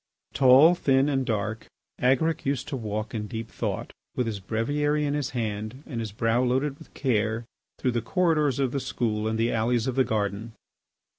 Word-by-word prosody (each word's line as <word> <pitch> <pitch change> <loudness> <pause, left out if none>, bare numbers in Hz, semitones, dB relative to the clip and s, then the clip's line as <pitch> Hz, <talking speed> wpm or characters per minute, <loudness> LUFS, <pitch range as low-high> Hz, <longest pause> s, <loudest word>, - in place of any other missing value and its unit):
Tall, 135 +5 +7
thin, 135 -5 +2
and 135 -3 0
dark, 110 0 -2 0.3
Agaric 140 +6 +2
used 140 -2 -1
to 145 - -3
walk 110 -3 -4
in 105 -2 -3
deep 115 0 -6
thought, - - -3 0.2
with 125 - 0
his 110 -3 -3
breviary 145 +9 0
in 145 - 0
his 145 -3 -1
hand 110 +1 -4
and 120 -6 -5
his 110 -2 -4
brow 115 +3 +1
loaded 135 +3 0
with - - -15
care, 115 -3 0 0.3
through 125 - 0
the 120 -1 -1
corridors 155 - +1
of 135 -3 +1
the 140 - -1
school 110 -4 -1
and 110 0 -1
the 115 +1 +1
alleys 115 +1 +1
of 130 - -1
the 130 +1 +3
garden. 110 -1 -2
120 Hz, 190 wpm, -26 LUFS, 110-140 Hz, 0.3 s, Tall